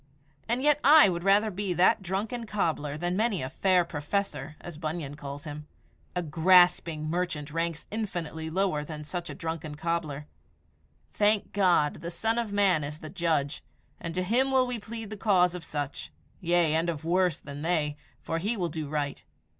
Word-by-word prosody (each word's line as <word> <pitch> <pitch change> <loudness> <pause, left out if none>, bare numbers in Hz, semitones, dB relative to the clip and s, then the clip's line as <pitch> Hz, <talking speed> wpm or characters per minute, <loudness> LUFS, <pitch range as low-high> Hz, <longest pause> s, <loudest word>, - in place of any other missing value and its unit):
And 245 +3 +1
yet 295 0 +4
I 300 -5 +8
would 175 -1 -3
rather 205 +3 +4
be 195 -1 -2
that 180 +3 +4
drunken 210 +6 -3
cobbler 155 -8 -1
than 175 +3 -1
many 215 - +1
a 130 - -5
"fair 185 -3 +3
professor," 150 -2 -3
as 170 -3 -9
Bunyan 155 -3 -4
calls 145 0 -7
him. 150 -1 -7 0.5
A 180 - 0
grasping 165 -1 +4
merchant 165 -3 -2
ranks 165 0 -2
infinitely 175 -7 -4
lower 180 -3 0
than 150 0 -7
such 170 +3 -5
a - - -6
drunken 160 -4 -5
cobbler. 155 -2 -2 0.9
Thank 210 0 +2
God, 175 -7 +2
the 170 - -4
Son 225 +7 0
of 230 -3 -3
Man 195 -6 +3
is 145 +1 -5
the 155 -1 -9
judge, 160 -6 -1 0.4
and 170 0 -5
to 185 - 0
him 245 +8 +2
will 260 -1 +4
we 250 -2 -3
plead 225 0 -7
the 215 - -5
cause 185 -4 +3
of 180 -2 -6
such 145 -2 -5 0.3
yea, 170 -2 +2
and 165 +2 +1
of 160 -2 -4
worse 180 -1 +2
than 145 0 -8
they 155 -3 0 0.3
for 165 - -2
He 215 +6 -1
will 175 -3 -1
do 155 -1 -4
right. 145 -2 -3
170 Hz, 180 wpm, -28 LUFS, 155-200 Hz, 0.9 s, I